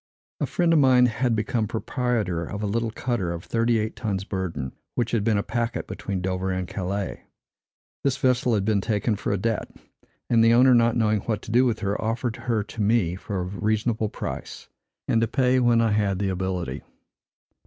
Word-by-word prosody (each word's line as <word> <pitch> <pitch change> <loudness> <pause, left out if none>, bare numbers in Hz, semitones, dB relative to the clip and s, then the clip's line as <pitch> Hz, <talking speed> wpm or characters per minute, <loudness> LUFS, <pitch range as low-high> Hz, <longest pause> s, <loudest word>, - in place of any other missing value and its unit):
A - - 0
friend 170 -2 +2
of 160 - +5
mine 130 -2 +6
had 125 0 +1
become 110 +1 0
proprietor 110 -6 -1
of 100 +5 -5
a - - +1
little 115 +3 0
cutter 110 -6 -2
of 85 0 -5
thirty 115 0 +1
eight 110 0 -2
tons 100 -4 -2
burden, 85 -10 -4 0.2
which 120 -2 0
had 115 -4 +1
been 110 -1 +2
a 100 - 0
packet 115 +1 -2
between 95 -3 -4
Dover 95 0 -1
and 90 -1 -2
Calais. 95 +2 -4 0.8
This 140 -1 +1
vessel 125 -3 +2
had 100 -2 0
been 105 -2 +2
taken 105 +1 0
for 100 - -3
a 100 - +1
debt; 115 +3 -1 0.6
and 115 -2 +4
the 115 +1 +6
owner, 130 +1 +6
not 115 -1 +4
knowing 110 -2 +2
what 105 +1 -3
to - - -7
do 125 +3 +5
with 115 -2 -1
her, 100 -1 -1
offered 115 +1 -1
her 115 -3 -1
to 110 +1 -7
me 105 -5 +2
for 95 0 -4
a - - -2
reasonable 110 +3 -1
price, - - -6 0.4
and 115 - +2
to 115 - +2
pay 130 +1 +2
when 120 -2 +4
I 115 -1 +2
had 105 -2 +1
the 100 0 -1
ability. 90 -6 -3
110 Hz, 200 wpm, -25 LUFS, 100-120 Hz, 0.8 s, mine